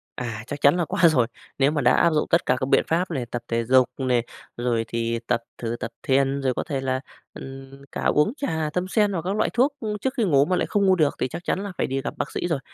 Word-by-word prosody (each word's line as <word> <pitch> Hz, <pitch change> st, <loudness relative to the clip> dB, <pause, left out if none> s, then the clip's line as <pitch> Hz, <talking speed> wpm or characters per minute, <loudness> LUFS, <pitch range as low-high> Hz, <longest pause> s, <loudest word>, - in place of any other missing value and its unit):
À, 115 Hz, -3 st, -5 dB
chắc 145 Hz, -1 st, -6 dB
chắn 140 Hz, +4 st, +5 dB
là 175 Hz, -, +1 dB
có 190 Hz, -, -4 dB
rồi. 150 Hz, -9 st, +5 dB, 0.3 s
Nếu 135 Hz, +1 st, +4 dB
mà 150 Hz, -1 st, 0 dB
đã 125 Hz, -, +4 dB
áp -, -, +4 dB
dụng 150 Hz, -, +1 dB
tất 170 Hz, -, +3 dB
cả 125 Hz, -, +3 dB
các 130 Hz, -, -2 dB
biện -, -, +4 dB
pháp 175 Hz, +3 st, 0 dB
này, 135 Hz, -6 st, -2 dB
tập 120 Hz, 0 st, -5 dB
thể 115 Hz, 0 st, 0 dB
dục 130 Hz, +1 st, +4 dB
này, 125 Hz, -3 st, +1 dB, 0.3 s
rồi 120 Hz, -2 st, 0 dB
thì 115 Hz, 0 st, -2 dB
tập 120 Hz, -1 st, 0 dB
thử 115 Hz, 0 st, -3 dB
tập 115 Hz, -2 st, -4 dB
thiền, 135 Hz, +1 st, +2 dB
rồi 130 Hz, -1 st, +1 dB
có -, -, -2 dB
thể 140 Hz, -4 st, -3 dB
là, 130 Hz, 0 st, -1 dB, 0.3 s
ừm, 135 Hz, 0 st, -10 dB
cả -, -, -4 dB
uống 150 Hz, +10 st, +3 dB
trà 160 Hz, -, -1 dB
tâm 180 Hz, +1 st, -1 dB
sen 210 Hz, +1 st, +2 dB
hoặc 170 Hz, -, -1 dB
các 185 Hz, +4 st, -2 dB
loại -, -, +1 dB
thuốc, 265 Hz, +5 st, +3 dB
ưm, 210 Hz, -2 st, -3 dB
trước 260 Hz, +5 st, -2 dB
khi 235 Hz, -, +2 dB
ngủ 145 Hz, -8 st, +4 dB
mà 185 Hz, -, +1 dB
lại -, -, +1 dB
không 200 Hz, -1 st, +1 dB
ngủ 190 Hz, -, +5 dB
được 155 Hz, -5 st, +2 dB
thì -, -, +1 dB
chắc 170 Hz, -, -7 dB
chắn 185 Hz, -, -1 dB
là 200 Hz, -, -5 dB
phải -, -, 0 dB
đi 135 Hz, +1 st, -2 dB
gặp 140 Hz, -, -4 dB
bác -, -, -3 dB
sĩ -, -, -2 dB
rồi. 165 Hz, -5 st, 0 dB
140 Hz, 285 wpm, -24 LUFS, 125-175 Hz, 0.3 s, chắn